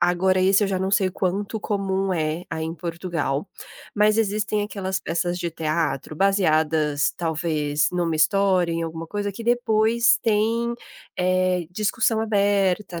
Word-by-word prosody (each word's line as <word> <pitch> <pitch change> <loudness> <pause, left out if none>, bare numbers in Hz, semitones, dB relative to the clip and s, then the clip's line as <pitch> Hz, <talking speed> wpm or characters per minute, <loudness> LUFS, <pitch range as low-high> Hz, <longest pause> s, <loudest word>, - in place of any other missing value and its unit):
agora 185 +1 +2
esse 195 +2 +4
eu 200 - +1
já 190 -1 -1
não 190 +1 -1
sei 190 -1 +2
quanto 200 +4 -2
comum 195 -2 -1
é 160 +1 -2
aí 160 0 -3
em 165 +1 -4
Portugal, 170 -2 -3 0.5
mas 210 +1 +3
existem 210 -1 0
aquelas 195 -2 -3
peças 175 +2 -2
de 175 -1 -3
teatro 155 -3 -2
baseadas, 155 -5 +2
talvez, 155 -3 0
em 180 - -2
uma 165 -2 0
história, 185 +2 +2
em 165 0 -2
alguma 165 0 -5
coisa, 205 +2 -3
que 230 - -8
depois 230 -1 +3
tem, 230 +2 +1 0.4
eh, 185 -1 +1
discussão 215 +3 0
aberta, 200 -4 +1
185 Hz, 150 wpm, -23 LUFS, 165-205 Hz, 0.5 s, esse